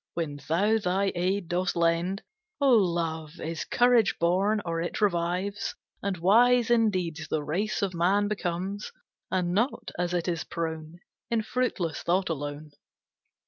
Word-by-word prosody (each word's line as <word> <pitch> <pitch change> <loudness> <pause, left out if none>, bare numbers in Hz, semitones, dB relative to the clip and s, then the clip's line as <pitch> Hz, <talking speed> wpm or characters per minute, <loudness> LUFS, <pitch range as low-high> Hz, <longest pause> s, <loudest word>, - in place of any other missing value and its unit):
When 155 -4 -3
thou 205 +7 +3
thy 195 0 +1
aid 180 +1 -1
dost 180 +1 0
lend, 170 +3 +1 0.4
O 280 -2 +4
Love, 170 -6 +1
is 165 0 -4
courage 240 -3 +4
born, 190 +5 +2
or 165 -1 -1
it 175 - -3
revives; 190 +1 0 0.3
And 195 -2 -2
wise 240 +7 +4
in 225 -2 +5
deeds 165 -5 -3
the 155 -1 -1
race 200 +9 -1
of 190 -2 -1
man 190 +4 +2
becomes, 195 0 -3 0.4
And 180 -2 0
not, 230 +8 0
as 180 0 0
it 175 0 -1
is 170 -2 -1
prone, 160 0 -5 0.3
In 230 -2 +1
fruitless 210 - -1
thought 185 +2 +1
alone. 145 0 -5
180 Hz, 145 wpm, -27 LUFS, 170-205 Hz, 0.4 s, in